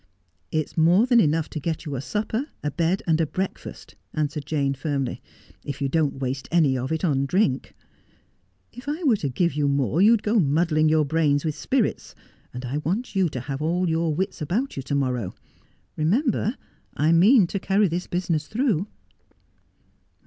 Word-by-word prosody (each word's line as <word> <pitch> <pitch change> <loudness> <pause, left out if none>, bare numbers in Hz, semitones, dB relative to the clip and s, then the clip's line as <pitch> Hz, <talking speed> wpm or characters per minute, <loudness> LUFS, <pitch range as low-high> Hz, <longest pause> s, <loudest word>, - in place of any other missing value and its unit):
' - - -45
It's - - -10
more 175 +7 +4
than 245 -2 +4
enough 160 -3 +2
to 155 - -4
get 160 +2 -3
you 145 -3 -4
a 125 - -3
supper, 220 - -2 0.2
a 150 - -1
bed, 170 +5 0
and 165 -1 +2
a 160 - +1
breakfast,' 190 +5 -5 0.2
answered 150 -1 -2
Jane 140 -3 0
firmly, 135 -1 -3 0.2
' - - -24
if 140 -2 -5
you 140 -1 -1
don't 150 -2 0
waste 130 0 -3
any 155 -6 +3
of 130 +2 -3
it 160 +2 -2
upon 140 -5 +1
drink. 140 -6 0 1.0
If 250 +4 -8
I 310 +5 -3
were 250 -8 +4
to 145 - -2
give 170 +5 0
you 145 0 0
more 140 - +1
you'd 220 +1 +5
go 215 +1 +2
muddling 155 0 +2
your 155 -1 +3
brains 145 -1 +1
with 155 - 0
spirits, 240 - -1 0.4
and 125 +1 -7
I 130 +4 -2
want 200 +9 -3
you 190 -3 +2
to 130 -4 -5
have 135 +2 -5
all 175 +4 0
your 165 0 +1
wits 190 0 -3
about 215 - -1
you 135 - -3
to 140 +2 -3
morrow. 125 -8 -1 0.6
Remember, 220 - +1 0.4
I 155 +3 +3
mean 195 +6 +6
to 195 +3 -3
carry 195 +2 +2
this 175 +2 -3
business 170 -4 -1
through.' 215 - 0
160 Hz, 185 wpm, -24 LUFS, 140-190 Hz, 1.0 s, mean